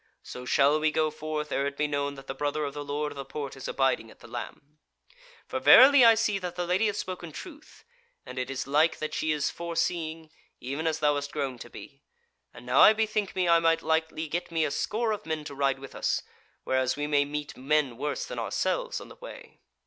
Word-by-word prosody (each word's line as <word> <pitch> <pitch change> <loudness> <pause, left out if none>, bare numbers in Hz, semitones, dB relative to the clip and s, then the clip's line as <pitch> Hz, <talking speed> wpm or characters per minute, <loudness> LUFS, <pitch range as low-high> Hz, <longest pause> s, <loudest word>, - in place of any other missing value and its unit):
So 125 - -8
shall 145 +3 +3
we 155 0 +2
go 155 0 +1
forth 155 0 -4
ere 140 - 0
it 140 0 -6
be 150 - +1
known 145 -1 -2
that 135 - -11
the - - -5
brother 145 +2 -2
of 140 - -5
the 145 - -5
Lord 145 +1 -3
of - - -10
the 140 - -5
Porte 140 0 -6
is 135 - -7
abiding 130 -4 0
at - - -17
the - - -13
Lamb. 150 +2 -8 0.7
For 260 - -3
verily 265 +1 +8
I 230 -1 +8
see 215 -2 0
that 180 -2 -5
the 180 - -2
Lady 185 +5 +2
hath 205 - -1
spoken 180 -4 -5
truth; 310 - -12 0.4
and 130 - -6
it 125 - -3
is 135 0 -3
like 150 +4 +2
that 155 - -4
she 155 - 0
is 150 -2 0
forseeing, 165 -2 -3 0.3
even 140 +6 -3
as 160 0 -1
thou 150 -1 +4
hast 145 0 -3
grown 135 -4 -3
to 120 - -10
be. 140 +2 -12 0.5
And - - -13
now 125 +2 +2
I 215 - +9
bethink 215 -2 -1
me 185 -1 +1
I 170 0 +6
might 165 0 +2
lightly 160 0 0
get 170 +4 -3
me 165 -1 +1
a 145 - -2
score 225 +7 -1
of 210 -4 -4
men 160 -1 -2
to 145 - -8
ride 135 -1 +1
with 135 0 -11
us, - - -1 0.4
whereas 130 0 +1
we 145 - -2
may 145 -1 +3
meet 150 +1 -5
men 140 -1 +1
worse 145 +4 -3
than - - -6
ourselves - - -1
on - - -10
the - - -13
way." - - -12
150 Hz, 235 wpm, -28 LUFS, 140-170 Hz, 0.7 s, I